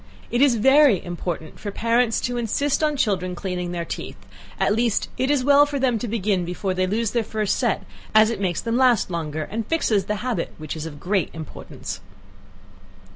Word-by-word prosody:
It 240 - +1
is 275 -4 +5
very 265 - +5
important 175 -2 -5
for 205 - -5
parents 230 +2 +1
to 245 0 -2
insist 265 +6 0
on 300 -1 +1
children 185 -7 0
cleaning 180 -1 -3
their 170 -1 -3
teeth, - - -6 0.4
at - - +3
least, 230 -1 +1
it 260 +1 0
is 290 -3 +2
well 285 +2 +6
for 290 -1 -3
them 255 -4 +1
to 245 - -3
begin 205 -4 0
before 180 +2 -2
they 185 0 0
lose 220 +3 0
their 235 -2 +1
first 215 -1 -1
set, - - 0 0.3
as 215 +1 +6
it 230 - -4
makes 175 -4 0
them 230 +1 -1
last 250 -7 +3
longer, 155 -2 -3
and 220 +6 -4
fixes 220 - +1
the 210 - -1
habit, 250 -3 -2
which 155 0 -6
is 160 0 -5
of 145 -2 -9
great 190 +1 0
importance. 160 -2 -7
215 Hz, 195 wpm, -23 LUFS, 180-245 Hz, 0.4 s, well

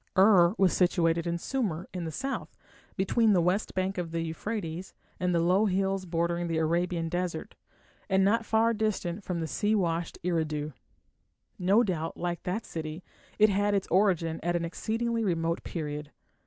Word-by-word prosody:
Ur 190 -2 +6
was 190 -3 +4
situated 170 -2 +2
in 170 0 0
Sumer, 185 -5 -2
in 180 -2 -4
the 160 - -4
south, 270 - -4 0.4
between 210 +3 +3
the 185 - +4
west 180 +5 0
bank 185 0 -1
of 170 -2 -3
the 165 0 -2
Euphrates 170 +1 -4 0.2
and 180 0 +1
the - - +3
low 185 +6 +3
hills 195 0 0
bordering 170 0 0
the 165 -1 -1
Arabian 170 +1 0
desert, 175 -1 -3 0.6
and 190 0 +4
not 225 +3 +3
far 225 +1 +2
distant 205 -3 -2
from 170 -3 -2
sea 205 +9 0
washed 170 -4 -1
Eridu. 155 -4 -1 0.9
No 195 +6 +4
doubt, 165 -6 -2
like 175 -1 -3
that 195 +6 -3
city, 160 +1 -6 0.3
it 215 0 +6
had 205 +1 +2
its 195 - 0
origin 175 -4 +2
at 175 +1 0
an 170 -1 0
exceedingly 230 +6 -1
remote 165 -3 0
period. 150 -3 -5
180 Hz, 165 wpm, -29 LUFS, 165-200 Hz, 0.9 s, Ur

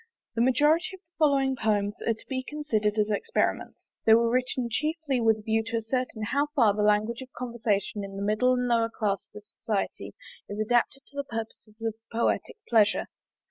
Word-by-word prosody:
The 230 - 0
majority 295 +9 +3
of - - -17
the 350 -2 -55
following 275 -3 +3
poems 210 -3 0
are 230 - +2
to - - -14
be 260 -1 -2
considered 230 -8 -1
as 210 0 +2
experiments. 455 - -2
They 220 - +7
were 230 0 +3
written 255 0 0
chiefly 300 +1 -1
with 225 -1 +4
a - - -11
view 220 +1 +1
to 230 0 -1
ascertain 225 0 -2
how 285 +1 +2
far 230 -7 +5
the 210 - -1
language 210 +3 +2
of 260 0 -10
conversation 225 -4 -1
in 195 0 -7
the 200 - -4
middle 215 +5 +3
and 250 0 0
lower 230 -1 +2
classes 205 -2 -2
of 210 0 -10
society 210 -1 -4 0.3
is 205 - -5
adapted 240 +4 +1
to 280 - -16
the 280 - -1
purposes 225 -2 -7
of 225 -1 0 0.2
poetic 235 - 0
pleasure. 215 -3 +3
230 Hz, 190 wpm, -27 LUFS, 215-260 Hz, 0.3 s, They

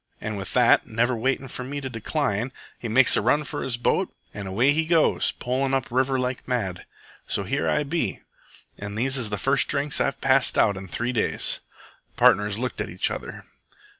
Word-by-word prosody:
An' 110 0 -4
with 100 -1 -6
that, 125 -1 +4
never 120 +2 +1
waitin' 135 +3 -1
for 125 - -6
me 140 +3 -5
to 135 - -5
decline, 125 -1 -2 0.3
he 120 - -5
makes 120 +4 +6
a - - +2
run 135 +7 +2
for - - -5
his 120 -3 -2
boat 120 - 0 0.2
an' 100 -1 -6
away 115 +9 +3
he 160 +2 +1
goes, 165 -1 +3
polin' 135 +2 -1
up 130 -3 -2
river 130 +2 +1
like 125 0 -3
mad. 95 -8 -2 0.4
So 100 - 0
here 135 +9 -1
I 150 - +1
be, 160 +4 -2 0.6
an' 100 0 -6
these 130 +4 0
is 120 -5 0
the 105 - -2
first 135 +3 +2
drinks 145 0 0
I've - - -1
passed 135 0 +2
out 100 -2 +4
in 95 0 -8
three 120 +7 -2
days." 115 - -1 0.6
The - - -8
partners 105 0 +4
looked 125 +2 -3
at - - -4
each 90 +2 -1
other. - - -7
125 Hz, 200 wpm, -24 LUFS, 110-135 Hz, 0.6 s, makes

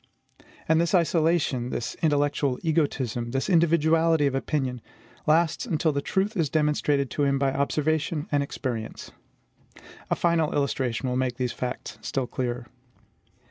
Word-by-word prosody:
And 160 +1 +4
this 170 +3 +1
isolation, 160 -7 +2
this 120 - -3
intellectual 145 -3 +1
egotism, 135 -7 0
this 135 +2 -1
individuality 165 -2 +3
of 140 - +1
opinion, 135 -2 -2 0.5
lasts 160 +1 +2
until 155 0 +1
the 140 -1 -1
truth 195 +8 -1
is 165 -6 +1
demonstrated 150 -3 +1
to 145 - 0
him 140 -1 +2
by 135 -1 +1
observation 150 +3 0
and 145 - +2
experience. 120 -5 -5 1.0
A - - +2
final 170 -3 +1
illustration 135 -3 -1
will 125 0 -1
make 130 -1 0
these 125 -1 -1
facts 125 0 -5
still 135 -2 -2
clearer. 120 -1 -3
145 Hz, 140 wpm, -26 LUFS, 130-160 Hz, 1.0 s, And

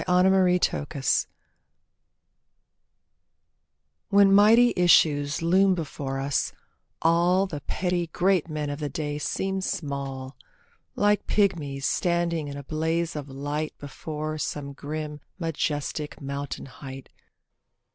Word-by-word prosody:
A - - -3
PLEA 180 0 +4
TO 145 -4 0
PEACE 140 -4 0 2.8
When 200 -1 +6
mighty 225 +4 +6
issues 150 -3 +4
loom 190 +3 +4
before 140 -4 -4
us, 140 +1 -1 0.5
all 175 +3 +4
The 150 -6 -6
petty 175 +3 -1
great 180 0 +1
men 150 -2 -3
of 145 - -5
the 150 -1 -3
day 145 +1 -3
seem 190 +5 -2
small, 140 -6 -4 0.6
Like 205 0 +2
pigmies 155 -10 0
standing 170 -3 0
in 140 0 -6
a 140 - -7
blaze 160 +2 -1
of 145 -2 -5
light 145 +3 -4
Before 155 +2 -5
some 140 -2 -4
grim 150 +1 -6 0.2
majestic 150 -3 -3
mountain 140 0 -5
height. 135 0 -10
155 Hz, 115 wpm, -26 LUFS, 145-180 Hz, 2.8 s, When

